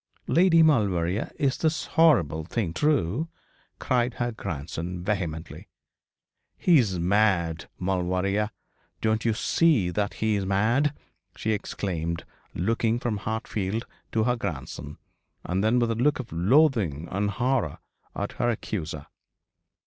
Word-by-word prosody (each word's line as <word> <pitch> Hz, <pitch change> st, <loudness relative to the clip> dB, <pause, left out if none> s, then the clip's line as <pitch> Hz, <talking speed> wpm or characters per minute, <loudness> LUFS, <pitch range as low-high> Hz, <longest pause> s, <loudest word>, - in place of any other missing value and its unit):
'Lady 165 Hz, -1 st, +5 dB
Maulevrier, 100 Hz, -, +2 dB
is 140 Hz, -4 st, +1 dB
this 160 Hz, 0 st, 0 dB
horrible 110 Hz, -, +4 dB
thing 90 Hz, 0 st, -2 dB
true?' 145 Hz, -, +1 dB, 0.5 s
cried 125 Hz, -1 st, 0 dB
her 120 Hz, 0 st, -1 dB
grandson, 85 Hz, -2 st, -5 dB
vehemently. 90 Hz, -6 st, -3 dB, 0.9 s
'He 170 Hz, -5 st, +5 dB
is 100 Hz, -7 st, +1 dB
mad, 85 Hz, -3 st, +1 dB
Maulevrier. 95 Hz, +3 st, 0 dB, 0.5 s
Don't 110 Hz, +1 st, 0 dB
you 115 Hz, -2 st, +2 dB
see 130 Hz, -, +2 dB
that 105 Hz, +3 st, -1 dB
he 110 Hz, -1 st, +1 dB
is 100 Hz, -, -1 dB
mad?' 115 Hz, +10 st, +1 dB, 0.4 s
she 110 Hz, -, -1 dB
exclaimed, 85 Hz, -5 st, -3 dB, 0.3 s
looking 115 Hz, +5 st, +1 dB
from 120 Hz, -3 st, -2 dB
Hartfield 110 Hz, 0 st, -3 dB, 0.3 s
to 110 Hz, -, +1 dB
her 125 Hz, +2 st, +2 dB
grandson, 75 Hz, -, -5 dB, 0.5 s
and 95 Hz, +2 st, -1 dB
then 110 Hz, +3 st, +3 dB
with 120 Hz, -1 st, +2 dB
a -, -, +2 dB
look 130 Hz, +6 st, +2 dB
of 130 Hz, -, -7 dB
loathing 95 Hz, -, +3 dB
and 100 Hz, +2 st, 0 dB
horror 120 Hz, -, 0 dB, 0.4 s
at -, -, -3 dB
her 120 Hz, -, 0 dB
accuser. 85 Hz, -10 st, -4 dB
105 Hz, 125 wpm, -26 LUFS, 90-120 Hz, 0.9 s, Lady